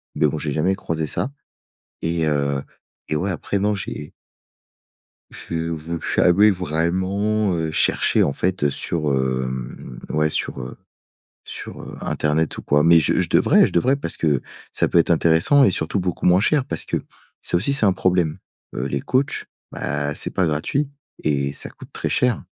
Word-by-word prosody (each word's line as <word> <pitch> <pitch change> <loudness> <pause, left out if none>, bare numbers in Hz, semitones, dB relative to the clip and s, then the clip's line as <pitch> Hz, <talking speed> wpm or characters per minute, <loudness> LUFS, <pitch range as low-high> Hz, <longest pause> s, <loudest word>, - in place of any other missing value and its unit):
Mais 75 0 +3
bon, 75 - -2
j'ai 75 -1 -3
jamais 85 +6 +1
croisé 80 -4 -3
ça. 125 - -1 0.7
Et 80 -1 0
heu 70 -2 0 0.5
et 75 - +1
ouais, 95 +6 -1
après 95 +2 -2
non, 105 +2 +1
j'ai 75 -7 -6 1.2
j'ai 80 0 -4
v 80 +1 -4 0.2
jamais 100 +4 +5
vraiment, 95 +5 0
heu, 80 -1 -2
cherché - - +2
en 70 - 0
fait, 90 +1 -1
heu, 75 - +4
sur, 75 -1 -2
hem, 65 -1 -3
ouais 75 0 +1
sur, 70 - -2
heu, 65 -1 -8 0.7
sur, - - -8
heu, - - -9
internet 75 +1 0
ou - - -5
quoi, 75 0 +3
mais 85 +1 +7
je 75 - +2
je - - -2
devrais - - +5
je - - -6
devrais 130 +11 +3
parce 140 -12 -4
que, 75 -5 +1 0.3
ça - - +1
peut - - +1
être 85 - +4
intéressant 85 - +5
et 100 - +5
surtout 85 +3 -1
beaucoup 90 -2 -3
moins 90 +1 +5
cher 140 +6 +2
parce - - -2
que, - - -1 0.4
ça - - 0
aussi 115 +10 +2
c'est 135 -5 +4
un 95 - +4
problème. 90 -4 +1 0.4
Heu, 65 - -2
les - - -2
coachs, 135 +3 0 0.3
bah, 75 0 -2
c'est - - -4
pas 95 - +2
gratuit, 85 - -1 0.3
et 70 -2 0
ça - - -6
coûte - - -14
très - - -2
cher. 125 -3 +1
80 Hz, 180 wpm, -22 LUFS, 75-95 Hz, 1.2 s, mais